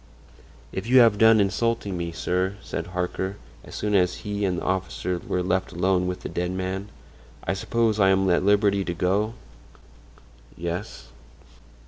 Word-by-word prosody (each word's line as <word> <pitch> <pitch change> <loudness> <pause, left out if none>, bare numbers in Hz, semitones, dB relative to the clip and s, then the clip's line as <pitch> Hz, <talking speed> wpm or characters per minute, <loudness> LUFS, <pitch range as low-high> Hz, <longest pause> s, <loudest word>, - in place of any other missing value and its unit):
"If 95 +3 -5
you 130 +2 +5
have 110 -3 +4
done 110 0 +7
insulting 100 0 0
me, 85 -1 -3
sir," 90 +3 -1
said 85 - -4
Harker, 90 +2 -3 0.3
as - - -11
soon 105 0 -2
as 90 -2 +3
he 105 0 -1
and 90 -2 0
the - - -4
officer 90 -1 -2
were 90 +1 -2
left 95 +1 0
alone 90 +1 +1
with 90 0 -4
the - - -5
dead 90 0 -2
man, 95 +2 -3 0.5
"I 95 - -1
suppose 110 +2 0
I 95 -1 +5
am 95 0 +3
at 85 - +3
liberty 100 0 +3
to 85 -2 -4
go?" 100 +6 0 1.2
"Yes." 85 +6 -5
95 Hz, 160 wpm, -25 LUFS, 90-105 Hz, 1.2 s, done